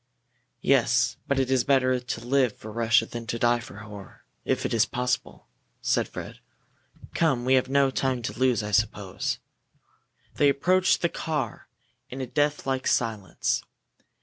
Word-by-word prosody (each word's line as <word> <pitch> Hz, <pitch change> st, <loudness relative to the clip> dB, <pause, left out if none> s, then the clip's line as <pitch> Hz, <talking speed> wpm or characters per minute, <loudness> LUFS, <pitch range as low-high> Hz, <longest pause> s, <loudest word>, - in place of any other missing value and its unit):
"Yes, -, -, +3 dB
but 140 Hz, -, +1 dB
it 135 Hz, -1 st, +1 dB
is 130 Hz, -2 st, +3 dB
better 130 Hz, -2 st, +3 dB
to 120 Hz, -1 st, -6 dB
live 130 Hz, -3 st, +2 dB
for 110 Hz, -, -9 dB
Russia 115 Hz, 0 st, +3 dB
than 115 Hz, 0 st, -7 dB
to 115 Hz, -, -2 dB
die 120 Hz, +1 st, +3 dB
for 120 Hz, -, -11 dB
her, 105 Hz, -2 st, -11 dB, 0.2 s
if -, -, 0 dB
it -, -, -1 dB
is 115 Hz, -2 st, +4 dB
possible," 125 Hz, +1 st, -2 dB, 0.3 s
said -, -, +1 dB
Fred. -, -, -8 dB, 0.7 s
"Come! 135 Hz, -8 st, +1 dB
We 130 Hz, -, +3 dB
have 130 Hz, 0 st, +3 dB
no 140 Hz, 0 st, +3 dB
time 130 Hz, -2 st, -1 dB
to -, -, -3 dB
lose, 125 Hz, -4 st, +2 dB
I 105 Hz, -, -4 dB
suppose." 105 Hz, -3 st, 0 dB, 1.0 s
They 145 Hz, -, +5 dB
approached 180 Hz, +7 st, +2 dB
the 170 Hz, -, +3 dB
car 150 Hz, -11 st, -4 dB, 0.4 s
in 130 Hz, -, -7 dB
a 130 Hz, -, -2 dB
death 145 Hz, +3 st, 0 dB
like 135 Hz, -1 st, -1 dB
silence. 110 Hz, -6 st, 0 dB
125 Hz, 160 wpm, -26 LUFS, 115-135 Hz, 1.0 s, They